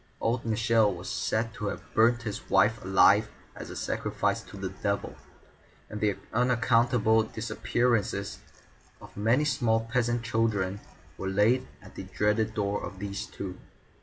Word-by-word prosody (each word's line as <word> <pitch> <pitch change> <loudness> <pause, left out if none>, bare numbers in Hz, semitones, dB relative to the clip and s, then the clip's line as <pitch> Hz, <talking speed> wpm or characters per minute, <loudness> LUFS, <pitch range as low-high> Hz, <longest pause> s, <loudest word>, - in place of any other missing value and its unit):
Old 115 +1 0
Michel 110 -1 +3
was 90 0 -7
said 115 -1 -1
to 105 -4 -4
have - - -6
burnt 120 +2 +3
his 105 -3 -6
wife 105 +4 +3
alive 100 +3 +5 0.3
as - - -8
a - - -7
sacrifice - - -1
to - - -12
the 95 -1 -4
Devil, 100 +1 -3 0.8
and 105 - -6
the 105 -2 +1 0.2
unaccountable 120 -1 +3
disappearances 110 -2 -1 0.6
of - - -14
many 115 +8 +2
small 115 -6 +2
peasant 120 -1 +1
children 105 -4 0 0.4
were 95 - -2
laid 110 +7 +2 0.2
at 95 - -14
the - - -7
dreaded 105 +3 0
door 100 -1 -1
of 95 +2 -7
these 100 0 -5
two. 95 -2 -7
110 Hz, 145 wpm, -28 LUFS, 100-115 Hz, 0.8 s, alive